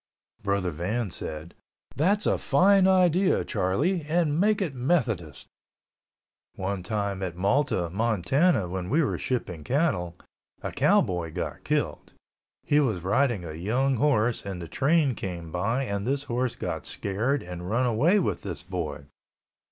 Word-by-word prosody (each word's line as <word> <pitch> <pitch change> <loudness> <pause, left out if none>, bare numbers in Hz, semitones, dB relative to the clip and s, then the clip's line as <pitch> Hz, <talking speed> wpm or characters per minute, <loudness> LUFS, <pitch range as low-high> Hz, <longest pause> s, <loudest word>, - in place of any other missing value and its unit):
Brother 100 -3 0
Van 95 +7 -2
said, 80 0 -6 0.4
"That's 200 +8 +2
a - - +2
fine 190 +6 +4
idea, 185 0 +3
Charlie, 130 - 0
and 160 -1 +1
make 210 +2 +3
it 180 -9 -2
Methodist." 120 - -1 1.1
One 95 0 -3
time 100 0 -2
at 90 -3 -3
Malta, 100 -1 +1
Montana, 115 - +2
when 90 0 -4
we 160 +5 +3
were - - -1
shipping 90 - -3
cattle, 110 - 0 0.5
a - - -3
cowboy 85 -3 +2
got - - -4
killed. - - -2 0.5
He 145 - +3
was 110 -11 +1
riding 105 -1 +1
a 80 - -6
young 120 - 0
horse 120 -4 +2
and 95 -3 -5
the 85 - -7
train 140 - +2
came 85 -6 -6
by 115 +10 0
and 100 -3 -3
this 140 +1 0
horse 125 -2 -1
got - - -4
scared 115 +9 -1
and 90 0 -7
run 120 +4 +1
away 140 - +3
with 185 - -1
this 90 -3 -6
boy. 80 -6 -5
110 Hz, 145 wpm, -26 LUFS, 90-145 Hz, 1.1 s, fine